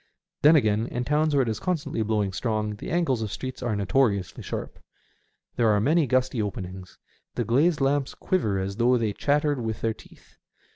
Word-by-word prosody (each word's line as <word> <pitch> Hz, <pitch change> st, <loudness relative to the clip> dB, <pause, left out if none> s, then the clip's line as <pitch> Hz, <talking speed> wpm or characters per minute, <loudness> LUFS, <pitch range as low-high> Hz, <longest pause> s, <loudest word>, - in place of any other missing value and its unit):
Then, 150 Hz, +3 st, +7 dB
again, 110 Hz, -5 st, +2 dB
in 120 Hz, 0 st, -3 dB
towns 150 Hz, +2 st, +1 dB
where 135 Hz, -, +4 dB
it -, -, -4 dB
is 110 Hz, -2 st, -2 dB
constantly 155 Hz, -9 st, -2 dB
blowing 105 Hz, -3 st, 0 dB
strong 105 Hz, 0 st, -2 dB
the -, -, -8 dB
angles 165 Hz, -9 st, +1 dB
of 105 Hz, -2 st, -3 dB
streets 130 Hz, +2 st, -6 dB
are 120 Hz, -4 st, -1 dB
notoriously 100 Hz, -1 st, 0 dB
sharp. -, -, -6 dB, 0.8 s
There 115 Hz, -2 st, +3 dB
are 105 Hz, -1 st, +3 dB
many 150 Hz, +7 st, +2 dB
gusty 130 Hz, -1 st, +1 dB
openings. 95 Hz, -2 st, -6 dB, 0.4 s
The -, -, -1 dB
glazed 150 Hz, +6 st, +2 dB
lamps 135 Hz, 0 st, +1 dB
quiver 110 Hz, -, 0 dB
as 95 Hz, +1 st, -3 dB
though 125 Hz, +1 st, +3 dB
they 110 Hz, -3 st, -1 dB
chattered 145 Hz, +2 st, +1 dB
with 110 Hz, -2 st, -4 dB
their 115 Hz, -1 st, 0 dB
teeth. -, -, -19 dB
120 Hz, 185 wpm, -26 LUFS, 105-145 Hz, 0.8 s, Then